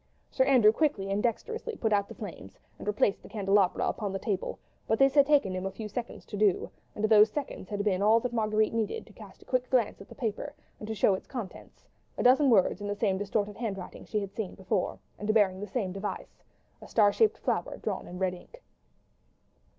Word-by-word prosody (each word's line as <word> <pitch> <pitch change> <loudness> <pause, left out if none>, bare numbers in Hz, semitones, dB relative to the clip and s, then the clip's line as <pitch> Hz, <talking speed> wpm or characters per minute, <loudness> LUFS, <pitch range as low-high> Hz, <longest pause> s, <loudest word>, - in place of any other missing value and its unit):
Sir 260 - +2
Andrew 250 -6 +6
quickly 220 -8 0
and 200 +1 0
dexterously 450 - -2
put 220 - 0
out 200 -1 +2
the - - -10
flames 170 - -9 0.2
and - - -9
replaced 210 -1 +1
the - - -13
candelabra 195 -3 +2
upon 205 -3 -2
the 195 - -2
table; 195 -2 -3 0.3
but 220 - +2
this 270 +2 +4
had 285 -2 +5
taken 280 -11 +3
him 185 0 -3
a - - -4
few 215 +2 -6
seconds 235 +3 -6
to 210 - -7
do, 205 -3 +2 0.2
and 210 - -5
those 215 0 +6
seconds 275 -6 -5
had 205 -1 -2
been 195 -2 +1
all 215 +3 +5
that 250 0 -3
Marguerite 215 -1 +1
needed 225 -2 -2
to 215 - -17
cast 200 -3 -14
a - - -32
quick 255 -1 -1
glance 240 -7 +1
at 195 - -13
the - - -12
paper, 250 +4 -4 0.2
and 210 - -7
to 220 -3 +1
note 190 - +3
its - - -26
contents—a 235 -8 -8
dozen 265 +3 +5
words 205 -2 +3
in 205 - -4
the 205 - -2
same 195 -3 0
distorted 205 0 -2
handwriting 200 -6 -5
she 210 - -2
had 200 -1 -6
seen 215 -4 -4
before, 190 0 -1 0.2
and 210 +1 0
bearing 190 -3 +3
the 205 - -5
same 195 -3 -2
device—a 195 +2 -9
star 205 -3 +4
shaped 440 -1 +3
flower - - -2
drawn - - -4
in 180 - -8
red 185 -1 0
ink. 485 - -14
210 Hz, 215 wpm, -29 LUFS, 195-235 Hz, 0.3 s, Andrew